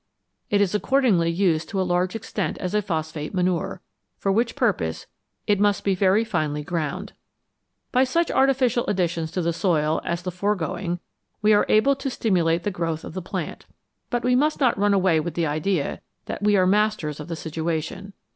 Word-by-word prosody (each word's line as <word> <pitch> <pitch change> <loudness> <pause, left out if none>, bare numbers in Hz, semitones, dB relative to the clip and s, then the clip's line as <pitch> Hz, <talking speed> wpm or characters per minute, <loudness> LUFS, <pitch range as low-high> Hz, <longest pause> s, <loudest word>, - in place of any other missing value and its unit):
It 205 -1 +3
is 200 -2 +1
accordingly 210 -7 +2
used 170 -3 +1
to 195 - -2
a - - +2
large 180 +2 0
extent 225 - -3
as 180 0 -4
a 210 - +2
phosphate 160 -3 -4
manure, 185 +1 0 0.4
for 195 - 0
which 230 +4 +1
purpose 205 - 0 0.4
it 205 -2 +2
must 205 -1 +2
be 195 - +2
very 195 +3 +3
finely 155 -9 -2
ground. 175 +5 -3 0.8
By 255 - +4
such 335 +6 +1
artificial 255 -3 +2
additions 170 -4 0
to 180 - -1
the 170 0 0
soil 160 -4 +1
as 170 +1 -3
the 180 - -3
foregoing 180 -1 -2 0.4
we 215 0 +5
are 205 - +3
able 270 +6 +4
to 275 0 -3
stimulate 175 -8 +1
the 205 - -1
growth 165 -3 -3
of - - -8
the 185 - -4
plant. 175 - -5 0.4
But 240 -1 -1
we 250 0 +3
must 300 +4 +2
not 255 -5 +3
run 205 0 +2
away 185 -4 +3
with 160 +1 -4
the 170 - +1
idea 155 +2 -1 0.2
that - - -5
we 205 0 +3
are 185 - +4
masters 200 -6 +1
of 150 - -7
the 170 - -4
situation. 165 +5 -4
185 Hz, 185 wpm, -24 LUFS, 165-210 Hz, 0.8 s, we